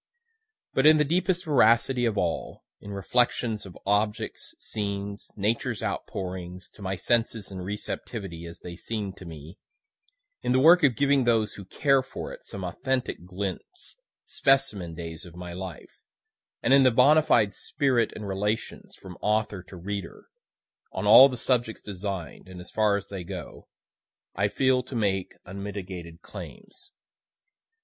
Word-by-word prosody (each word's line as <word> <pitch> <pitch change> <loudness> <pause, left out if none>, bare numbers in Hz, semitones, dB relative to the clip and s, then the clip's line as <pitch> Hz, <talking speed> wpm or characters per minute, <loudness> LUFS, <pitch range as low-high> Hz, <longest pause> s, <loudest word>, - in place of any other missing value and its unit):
But 135 +3 +4
in 155 0 +8
the 150 - +3
deepest 180 +3 +1
veracity 125 -3 +4
of 110 -3 0
all 85 -4 -2 0.2
in 100 - -11
reflections 110 +1 0
of 90 - -12
objects, 105 +2 -1
scenes, 100 -1 -4
Nature's 115 +3 -1
outpourings, 90 -1 -5
to - - -17
my 95 -1 -2
senses 115 0 0
and 95 -1 -6
receptivity, 95 -3 -5
as 85 - -11
they 85 -1 -8
seem'd 100 0 -4
to 95 - -11
me 80 +2 -10 0.8
in - - +1
the 130 - +4
work 170 +6 +7
of 135 -6 +4
giving 140 +1 +3
those 110 -3 +2
who 100 - -9
care 135 +7 +2
for 130 - -7
it, - - -12
some 100 - -5
authentic 125 0 -2
glints, 95 - -6 0.3
specimen 110 -12 +1
days 85 0 -6
of 85 -2 -12
my 90 -1 -7
life 90 -2 -8 0.6
and 130 - +4
in 140 - +8
the 130 - +6
bona 140 +6 +6
fide 105 -9 +3
spirit 130 +1 +1
and 105 - -6
relations, 105 +3 -3
from 95 -2 -12
author 105 -2 0
to 90 +1 -13
reader, 95 0 -6 0.7
on - - -3
all 135 +2 +10
the 125 - -5
subjects 120 -2 0
design'd, 95 -3 -5
and 90 -1 -9
as 90 - -11
far 105 -2 +3
as 100 - -8
they 95 -3 -5
go, 85 - -8 0.7
I 100 +2 +1
feel 130 +4 +2
to 125 +1 -9
make 95 -4 0
unmitigated 95 -3 -7
claims. 405 - -10
105 Hz, 155 wpm, -27 LUFS, 95-125 Hz, 0.8 s, all